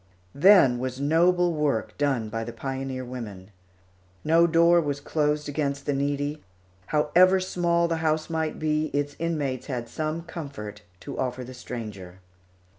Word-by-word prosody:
Then 140 -7 +6
was 130 0 -4
noble 175 +4 +3
work 150 -8 -1
done 135 -6 0
by 115 +1 -3
the 120 - -6
pioneer 130 +1 -4
women. 105 -6 -8 0.7
No 165 +2 +4
door 170 +1 +5
was 145 -2 -2
closed 150 0 0
against 140 -1 -2
the 145 - 0
needy. 145 +2 -2 0.4
However 175 +5 +4
small 170 -2 +1
the 165 -1 -1
house 155 -1 0
might 160 -1 -2
be, 155 0 0
its 145 0 -1
inmates 150 -6 -2
had 125 -4 -4
some 155 +6 -3
comfort 140 -12 -7 0.2
to - - -7
offer 125 0 -2
the 130 +1 -9
stranger. 105 -8 -8
145 Hz, 145 wpm, -26 LUFS, 130-160 Hz, 0.7 s, Then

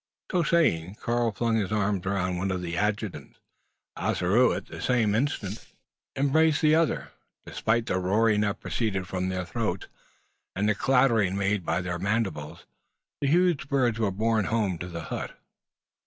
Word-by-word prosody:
So 180 - +2
saying, 105 - +1
Karl 120 +1 0
flung 115 +2 0
his 100 -3 -1
arms 100 -3 0
around 90 -2 -1
one 95 +2 -1
of 90 -1 -2
the 85 -1 -3
adjutants. 105 +1 -2 0.6
Ossaroo 105 +8 +2
at - - -3
the - - -9
same 115 -5 +2
instant 110 -4 -2 0.5
embraced 150 +3 +2
the 155 0 +5
other; 165 -1 +2 0.5
and, - - -10
despite 115 +1 +1
the 90 - 0
roaring 105 +3 +2
that 105 0 -1
proceeded 95 -5 -2
from 95 0 -2
their 90 -1 -3
throats, 100 0 -3 0.7
and 100 +2 0
the 105 - +4
clattering 115 -5 +2
made 100 -1 0
by 85 +2 0
their 90 -1 -3
mandibles, 100 -8 -2 0.6
the 140 - +1
huge 170 -2 +2
birds 125 -5 +1
were 110 -3 +2
borne 110 +2 +1
home 105 -6 0
to 90 - -5
the 85 -2 -6
hut. - - -5
105 Hz, 165 wpm, -27 LUFS, 95-120 Hz, 0.7 s, the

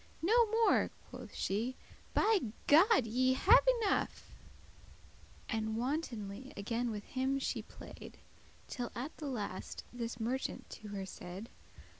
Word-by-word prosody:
"No 455 +6 +5
more," 450 +1 +3 0.2
quoth - - -9
she, 225 +7 -1 0.4
"by 430 -1 +4 0.3
God 340 - +6
ye 255 +3 +2
have 425 - +6 0.2
enough;" 395 - 0 1.2
And 220 -1 -1
wantonly 245 -4 -3
again 230 +4 -1
with 210 -2 -4
him 265 +1 0
she 270 - -1
play'd, - - -11 0.5
Till 245 -2 -4
at 265 +6 -4
the 300 - -5
last 210 -8 -4
this 235 -1 -4
merchant 245 +4 -2
to 215 - -9
her 200 -2 -4
said. 190 +4 -8
245 Hz, 125 wpm, -34 LUFS, 220-295 Hz, 1.2 s, God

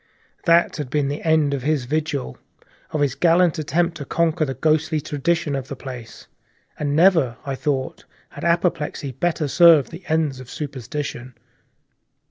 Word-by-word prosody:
That 170 -1 +4
had 145 -4 -4
been 140 0 0
the 145 - -4
end 155 -3 +2
of 140 - -2
his 145 -2 0
vigil, 150 - -3 0.5
of 155 - -2
his 140 -3 +2
gallant 170 +3 +3
attempt 165 +3 0
to 145 - -6
conquer 165 +1 +1
the 135 -2 -4
ghostly 155 +2 +1
tradition 150 +1 -1
of 135 -1 -4
the 140 - -6
place, 125 -3 -9 0.5
and 145 -1 -1
never, 160 -8 +4
I 140 - -2
thought, 135 -1 -3 0.2
had - - -10
apoplexy 170 -5 0
better 155 +3 -1
served 165 -2 +6
the 170 +3 -10
ends 155 -4 0
of 130 -1 -11
superstition. 135 -3 -6
150 Hz, 155 wpm, -22 LUFS, 135-165 Hz, 0.5 s, served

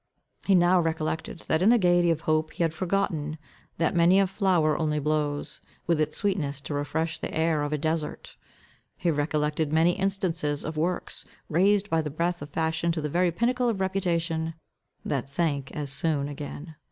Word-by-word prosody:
He 195 - +4
now 180 +1 +5
recollected, 160 0 -2
what 160 - +1
in 195 - +5
the 240 - +6
gaiety 175 -3 +3
of 160 -1 +1
hope 155 -1 0
he - - -1
had 165 -1 0
forgotten, 165 -4 -1 0.4
that 165 +1 +1
many 175 +3 +5
a 195 - +4
flower 185 -5 +2
only 155 -2 0
blows, 150 -1 -1 0.2
with 165 -2 +2
its 155 0 -1
sweetness 165 -9 -1
to 140 - -5
refresh 160 +3 -2
the - - -4
air 160 -1 +1
of 145 0 -2
a 150 - 0
desert. 155 +1 -3 0.6
He 170 - +1
recollected 150 0 0
many 160 +2 +4
instances 175 -6 -1
of 155 - -4
works, 175 +4 -2 0.3
raised 195 +5 +3
by 165 - +3
the 150 - -4
breath 170 +4 -1
of 145 - -7
fashion 160 +2 0
to 160 - -3
the 150 - -2
very 175 +3 +2
pinnacle 245 +6 +1
of 215 -4 -2
reputation, 170 -4 -1 0.5
that 135 -2 -2
sunk 140 -2 -1
as 145 -2 -4
soon 145 -1 +1
again. 145 +2 -7
160 Hz, 180 wpm, -27 LUFS, 150-175 Hz, 0.6 s, the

